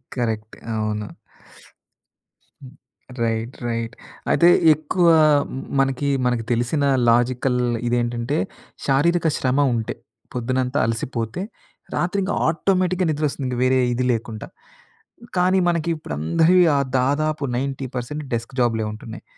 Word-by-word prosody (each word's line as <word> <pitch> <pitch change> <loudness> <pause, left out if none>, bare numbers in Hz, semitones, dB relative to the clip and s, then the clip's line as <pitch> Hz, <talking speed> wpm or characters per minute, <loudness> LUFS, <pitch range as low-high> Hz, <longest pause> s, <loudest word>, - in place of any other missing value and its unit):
Correct. 110 -3 -3 0.2
అవును. 105 -1 -2 1.6
హ్మ్. 130 +2 -12 0.5
Right, 115 +2 -2
right. 115 0 -3 0.4
అయితే 170 - +5 0.2
ఎక్కువా 165 +2 +3 0.6
మనకి 135 +1 +1 0.2
మనకి 120 -2 0
తెలిసిన 120 +5 0 0.3
లాజికల్ 125 +1 +2 0.3
ఇదేంటంటే, 120 +3 -1 0.5
శారీరక 165 +5 +2
శ్రమ 130 +1 0 0.2
ఉంటే 115 -1 -3 0.4
పొద్దునంతా 130 +2 -1
అలసిపోతే 115 +4 -3 0.5
రాత్రి 180 +3 0
ఇంక 195 - -1
ఆటోమేటిక్‌గా 185 +2 +1
నిద్రొస్తుంది, 145 -2 -2
ఇంక 125 - -3
వేరే 130 0 +3
ఇది 125 +1 -1
లేకుంట. 115 -2 -4 0.9
కానీ, 185 +1 +3
మనకి 170 -1 0
ఇప్పుడు 155 - -7
అందరివి 165 - +4 0.4
దాదాపు 150 +3 0
90% 135 +1 -4
డెస్క్ 120 +3 -3
జాబ్‌లే 115 -2 +1
ఉంటున్నాయి. 110 +1 -9
130 Hz, 105 wpm, -22 LUFS, 115-155 Hz, 1.6 s, అయితే